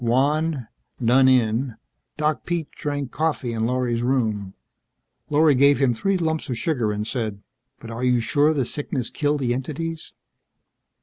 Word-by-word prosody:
Wan, 140 +2 +1 0.4
done 130 +3 +5
in, 120 -1 +2 0.4
Doc 150 0 0
Pete 170 -3 -3
drank 145 -3 -4
coffee 145 -6 -1
in 110 0 0
Lorry's 125 -2 0
room. 110 -6 -1 0.7
Lorry 150 0 +4
gave 140 +2 +5
him 130 -2 +2
three 195 - 0
lumps 160 -4 -2
of 125 - -2
sugar 125 -7 0
and 105 0 -3
said, 110 -4 -3 0.4
"But 115 - -9
are 115 +2 -5
you 125 -1 +3
sure 145 +5 +2
the 140 -5 0
sickness 130 -3 -3
killed 145 -1 0
the 120 -2 +1
entities?" 155 +5 -5
130 Hz, 150 wpm, -23 LUFS, 120-150 Hz, 0.7 s, done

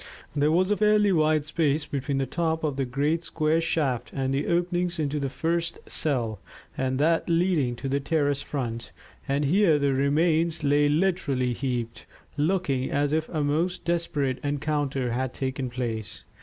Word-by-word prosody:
There 145 +1 +3
was 185 +4 +2
a 210 - +2
fairly 210 -1 +4
wide 155 -3 +2
space 150 -1 0
between 140 -1 -2
the 135 - +1
top 160 +1 -1
of 150 -3 0
the 135 -1 -1
great 145 +6 0
square 160 0 +1
shaft 145 -7 -1
and 135 0 -1
the 140 +2 -1
openings 175 0 0
into 150 -1 -1
the 140 -1 -2
first 165 +4 -1
cell 120 -8 -1 0.4
and 130 0 -1
that 165 +4 +2
leading 165 -7 +2
to 135 - -5
the 140 +1 0
terrace 145 -1 0
front, 120 -5 -4 0.4
and 140 +1 +1
here 170 +1 +4
the 140 -1 +1
remains 160 +4 +1
lay 145 +1 +3
literally 145 -7 +1
heaped, 120 -3 -4 0.3
looking 150 -4 0
as 145 +1 0
if 160 0 0
a 155 -3 -1
most 160 +5 -1
desperate 150 -6 -1
encounter 145 -3 -1
had 125 +1 -2
taken 130 -1 -3
place. 115 -4 -4
145 Hz, 165 wpm, -26 LUFS, 135-165 Hz, 0.4 s, fairly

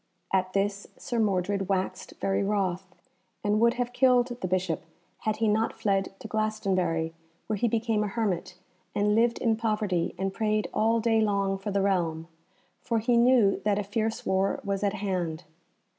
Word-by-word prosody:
At 185 -1 +1
this 200 0 -1
Sir 240 -4 -3
Mordred 195 -2 0
waxed 190 -1 -2
very 195 0 0
wroth, 195 -2 -1 0.6
and 210 0 +2
would 235 +1 +4
have 245 0 -2
killed 250 -1 +4
the 185 - -1
Bishop 185 -2 -1 0.4
had 215 -1 +1
he 225 - +1
not 220 +2 +1
fled 195 -3 0
to 220 - -9
Glastonbury, 185 -7 0 0.3
where 215 - -2
he 235 - +1
became 225 -1 +1
a - - -1
hermit, 195 -4 -2 0.4
and 205 0 +2
lived 235 +2 +3
in 225 -2 +2
poverty 210 -6 -1
and 195 0 -2
prayed 215 -1 0
all 225 +1 +2
day 225 -1 +2
long 200 -2 +1
for 195 - -4
the 200 -1 +1
realm, 165 -5 0 0.5
for 230 - -1
he 235 +2 +2
knew 235 -4 +4
that 205 -1 +2
a 205 - 0
fierce 220 +2 -2
war 190 +1 +1
was 200 0 -2
at 200 -1 +1
hand. 180 -5 -2
205 Hz, 175 wpm, -27 LUFS, 190-220 Hz, 0.6 s, would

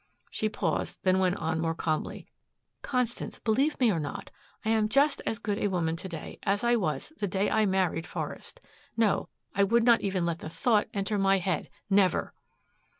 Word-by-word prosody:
She 215 - -1
paused, 170 -6 -2
then 185 0 +3
went 185 -1 +2
on 160 0 -1
more 165 0 0
calmly, 155 -1 -2 0.6
"Constance, 250 -3 -2
believe 270 +7 +1
me 245 -4 +4
or 170 - 0
not 145 -2 -5 0.3
I 220 - +2
am 215 -1 +2
just 280 +6 +3
as 220 - 0
good 210 -2 -2
a - - +1
woman 170 -4 0
to 190 - -7
day 165 -3 -7
as 200 +2 0
I 240 0 +4
was 195 - -2
the 205 - 0
day 195 +2 0
I 220 -1 +3
married 185 -3 0
Forest. - - -6 0.4
No 225 -3 +2 0.2
I 200 - +3
would 230 +4 +3
not 235 -1 +5
even 190 -3 0
let 170 -1 -1
the - - -6
thought 215 +5 +2
enter 200 +1 -1
my 195 0 +4
head 185 0 -1 0.2
never!" 195 -3 +2
200 Hz, 190 wpm, -29 LUFS, 175-220 Hz, 0.6 s, not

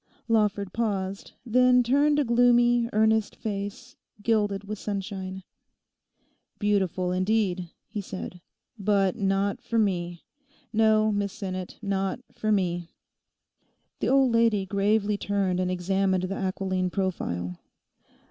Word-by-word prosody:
Lawford 205 -4 +1
paused, 200 -4 -2
then 250 +1 +4
turned 285 +4 +3
a 295 - +3
gloomy, 240 -1 +4
earnest 220 0 +2
face, 205 +4 -5 0.3
gilded 205 -3 +1
with 210 0 -6
sunshine. 190 -2 -5 1.1
'Beautiful, 190 -3 0
indeed,' 185 -2 0 0.2
he 210 - -4
said, 185 -2 -7 0.4
'but 195 -2 +2
not 195 -1 0
for 230 - -2
me. 175 -5 0 0.5
No, 215 0 +4
Miss 205 -1 -1
Sinnet, 185 -4 -5
not 195 +1 -1
for 215 - -1
me.' 175 -4 0 1.1
The - - 0
old 270 -2 +4
lady 230 -4 +3
gravely 205 +1 +1
turned 195 -3 0
and 185 0 0
examined 185 +1 0
the 190 +1 -2
aquiline 185 -1 -1
profile. 90 - -3
200 Hz, 115 wpm, -26 LUFS, 190-220 Hz, 1.1 s, then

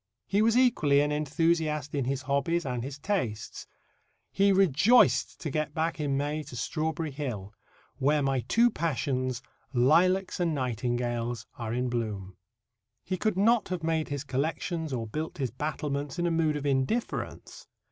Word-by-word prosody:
He 200 +2 +1
was 225 +2 +4
equally 155 - +4
an 150 0 +1
enthusiast 150 0 0
in 140 -3 0
his 135 +1 -2
hobbies 140 +5 0
and 125 -3 -2
his 135 +2 -6
tastes. 140 - -3 0.6
He 200 +1 +3
rejoiced 155 - +4
to 155 - -3
get 155 +3 -2
back 165 0 -1
in 140 -2 0
May 145 +2 -1
to 135 -4 -10
Strawberry 155 +4 -2
Hill, 120 -8 -5 0.4
"where 145 +2 +2
my 135 -1 +1
two 230 - +3
passions, 130 - -1 0.3
lilacs 175 +11 +3
and 170 -3 +1
nightingales, 120 -2 -2
are 115 -2 -3
in 125 +2 0
bloom." 105 -6 -3 0.7
He 185 - -2
could 200 +1 -1
not 220 +1 +3
have 180 -3 -3
made 160 -1 0
his 145 -2 -3
collections 155 +4 -2
or 120 -3 -2
built 155 +9 -5
his 130 -5 -2
battlements 145 +2 -3
in 175 - 0
a 170 - +1
mood 160 -2 +1
of 145 -1 -4
indifference. 140 - -2
145 Hz, 155 wpm, -28 LUFS, 130-165 Hz, 0.7 s, was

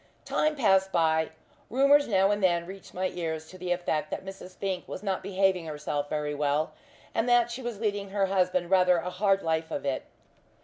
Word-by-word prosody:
Time 305 0 +1
passed 195 -7 +3
by. 160 -2 +2 0.4
Rumours 275 +4 +4
now 195 -2 +3
and 205 0 0
then 175 -2 +3
reached 190 +1 -10
my 185 0 0
ears 160 -2 -4
to 185 - -11
the 180 0 -3
effect 175 -3 -1
that - - -5
Mrs. 190 -1 -9
Fink 190 -2 -3
was 185 - -7
not 195 -2 -1
behaving 190 -3 +1
herself 150 -1 -3
very 150 -1 -2
well, 145 +1 0 0.4
and 230 +2 0
that 240 -1 +4
she 250 +3 -5
was 240 -4 -5
leading 205 -3 -2
her 200 0 +1
husband 185 -2 +1
rather 180 -1 +5
a 175 +2 -3
hard 195 +1 +2
life 160 0 0
of - - -4
it. 135 -2 -1
185 Hz, 195 wpm, -28 LUFS, 165-200 Hz, 0.4 s, rather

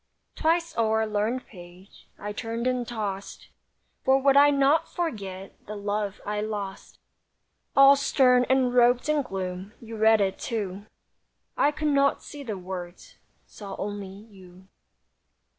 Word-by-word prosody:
Twice 335 +1 0
o'er 220 -1 +2
a - - +1
learned 215 +4 -1
page 180 0 -15
I 210 0 -6
turned 230 +2 -4
and 250 -2 0
tossed, 205 -4 -5 0.5
For 265 +1 +4
would 275 0 +3
I 285 +1 +7
not 280 +2 +2
forget 200 - -5
The 210 - -6
love 205 0 -3
I 210 0 -2
lost. 205 -3 -6 0.8
All 275 0 +8
stern 255 -2 +3
and 260 -1 +2
robed 245 +1 +4
in 305 -1 +2
gloom, 190 -3 -5
You 225 -1 -9
read 220 0 +5
it 195 -2 0
too, 205 -3 -4 0.7
I 285 - +3
could 300 +1 -2
not 280 -1 +2
see 290 - -9
the 220 -7 -5
words— 180 -1 -8 0.3
Saw 200 -2 -9
only 205 -1 -5
you. 190 -2 -15
220 Hz, 140 wpm, -26 LUFS, 195-265 Hz, 0.8 s, All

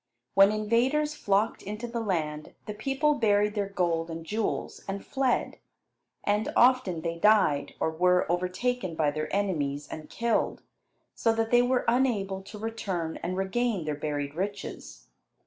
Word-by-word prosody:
When 195 +1 +7
invaders 240 +8 +1
flocked 205 -5 0
into 210 +3 -5
the 235 0 -3
land, 155 -8 -2
the 210 - -5
people 270 +7 +1
buried 210 -5 +2
their 205 -2 -2
gold 170 -3 0
and 165 0 -6
jewels, 215 +5 -3
and 195 0 -4
fled. 265 -2 0 0.6
And 210 +1 0
often 245 -9 +4
they 170 0 -3
died, 165 -9 +3
or 160 - +1
were 180 +2 +3
overtaken 185 +3 -1
by 155 -2 +2
their 155 +1 -4
enemies 150 -8 -1
and 155 - -8
killed, 235 0 0 0.5
so 230 - +2
that 225 0 -1
they 240 0 +6
were 250 +1 +1
unable 215 -6 +1
to 205 +2 -10
return 200 -7 -3
and 180 +2 -3
regain 195 -1 0
their 150 - -1
buried 145 -1 -3
riches. 200 +4 -5
200 Hz, 150 wpm, -28 LUFS, 165-230 Hz, 0.6 s, When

